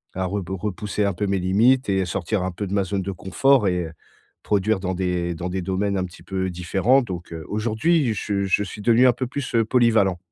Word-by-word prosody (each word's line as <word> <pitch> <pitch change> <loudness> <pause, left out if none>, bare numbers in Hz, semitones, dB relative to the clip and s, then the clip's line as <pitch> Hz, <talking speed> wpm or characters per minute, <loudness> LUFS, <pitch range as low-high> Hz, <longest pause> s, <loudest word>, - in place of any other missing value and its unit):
à 95 0 -1
reb 95 0 -3
repousser 105 +2 -2
un 100 - 0
peu 100 +4 -2
mes 100 0 +1
limites 110 +8 +3
et 95 -1 +1
sortir 90 +4 -2
un 95 - -1
peu 90 +4 -5
de 95 - -5
ma 100 - +2
zone 95 0 -2
de 100 - -3
confort 105 +6 +2
et 90 -1 0
heu, 80 - -8 0.5
produire 105 0 +1
dans 95 0 -2
des 90 -2 -1
dans 90 +2 -4
des 95 0 -3
domaines 95 +2 -1
un 95 - -1
petit 90 +2 -13
peu 95 -1 -2
différents, 95 +9 +2
donc, 90 -6 -7
heu, 80 -1 -7
aujourd'hui, 115 +7 +1
je 100 -1 -1
je 95 +2 +2
suis 105 +2 -8
devenu 120 +4 +4
un 125 - +5
peu 130 - -3
plus 130 +1 -5
heu, 115 - +3
polyvalent. 110 -6 +3
100 Hz, 235 wpm, -23 LUFS, 90-110 Hz, 0.5 s, un